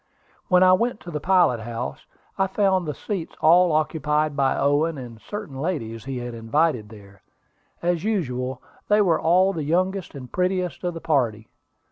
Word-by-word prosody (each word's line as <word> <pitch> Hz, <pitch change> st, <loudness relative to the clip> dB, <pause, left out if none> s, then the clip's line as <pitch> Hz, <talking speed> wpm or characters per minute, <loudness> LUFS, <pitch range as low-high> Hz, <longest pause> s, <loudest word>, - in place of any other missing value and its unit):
When 180 Hz, -1 st, +5 dB
I 185 Hz, 0 st, +7 dB
went 230 Hz, +4 st, +1 dB
to 175 Hz, -, -9 dB
the 150 Hz, -, -3 dB
pilot 175 Hz, -9 st, +3 dB
house, 115 Hz, +2 st, -6 dB, 0.3 s
I 195 Hz, -1 st, +1 dB
found 190 Hz, -3 st, +1 dB
the 150 Hz, -, -2 dB
seats 185 Hz, -1 st, -5 dB
all 175 Hz, +2 st, +5 dB
occupied 155 Hz, -1 st, 0 dB
by 135 Hz, -1 st, +1 dB
Owen 145 Hz, +3 st, +1 dB
and 120 Hz, -4 st, -9 dB
certain 205 Hz, -9 st, -7 dB
ladies 115 Hz, -9 st, -3 dB
he 135 Hz, -1 st, -4 dB
had 120 Hz, -1 st, -5 dB
invited 115 Hz, 0 st, 0 dB
there. 100 Hz, -3 st, -15 dB, 0.6 s
As 175 Hz, -1 st, 0 dB
usual 130 Hz, -, -2 dB, 0.2 s
they 210 Hz, 0 st, +4 dB
were 170 Hz, -4 st, +2 dB
all 185 Hz, +4 st, +4 dB
the 160 Hz, -4 st, -3 dB
youngest 185 Hz, +3 st, -1 dB
and 130 Hz, -3 st, -9 dB
prettiest 180 Hz, -1 st, -1 dB
of 175 Hz, -1 st, -2 dB
the 165 Hz, -, -6 dB
party. 115 Hz, -8 st, 0 dB
155 Hz, 170 wpm, -23 LUFS, 125-185 Hz, 0.6 s, I